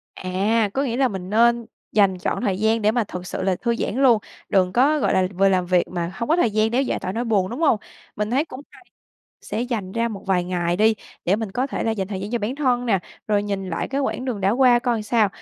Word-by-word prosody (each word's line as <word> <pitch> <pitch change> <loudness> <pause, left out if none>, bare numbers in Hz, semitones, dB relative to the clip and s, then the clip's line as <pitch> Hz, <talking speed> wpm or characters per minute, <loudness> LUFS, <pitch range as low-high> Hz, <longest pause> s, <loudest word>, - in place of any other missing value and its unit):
À, 205 +4 0
có 275 - +1
nghĩa 240 -3 -1
là 265 -1 +3
mình 190 -1 -6
nên 235 +1 +3 0.3
dành 195 -3 +3
trọn 180 - -2
thời 195 -4 0
gian 220 0 +2
để 210 - +4
mà 240 -2 +1
thực 180 -2 -7
sự 185 - -4
là 185 -1 +1
thư 235 +2 -1
giãn 230 - -2
luôn, 240 -5 +6 0.3
đừng 185 -2 +2
có, 290 +5 +3
gọi - - +1
là, 185 -1 +3
vừa 195 +2 +4
làm 185 -2 +1
việc 180 -1 +2
mà 175 0 -3
hông 230 +4 -4
có 325 - +4
thời 240 -10 +2
gian 215 +1 +1
để 250 +3 +2
giải 260 - -1
tỏa 185 - -4
nỗi 235 +3 -2
buồn, 200 -4 +1
đúng 245 +7 -5
hông? 300 -8 +4 0.4
Mình 210 +1 -2
thấy 275 +5 +2
cũng 255 -4 -9
hay - - -18 0.6
sẽ 220 +3 -3
dành 215 -7 -3
ra 230 0 0
một 205 -3 -7
vài 180 -2 +1
ngày 175 -1 -1
đi 220 +2 +4 0.3
để 190 +4 +2
mình 220 -3 -4
có 255 +5 0
thể 275 - -3
là 225 - 0
dành 195 -3 -2
thời 190 -2 -4
gian 200 +2 -5
cho 240 - 0
bản 220 +4 -2
thân 250 -4 +1
nè, 195 -4 +3 0.3
rồi 205 -1 +2
nhìn 195 -2 -3
lại 165 - -2
cái 275 +1 -1
quãng 265 -2 -2
đường 240 -6 -3
đã 190 +1 +2
qua 245 +1 +5
coi 240 -3 -1
sao. 215 0 +2
215 Hz, 270 wpm, -22 LUFS, 190-240 Hz, 0.6 s, luôn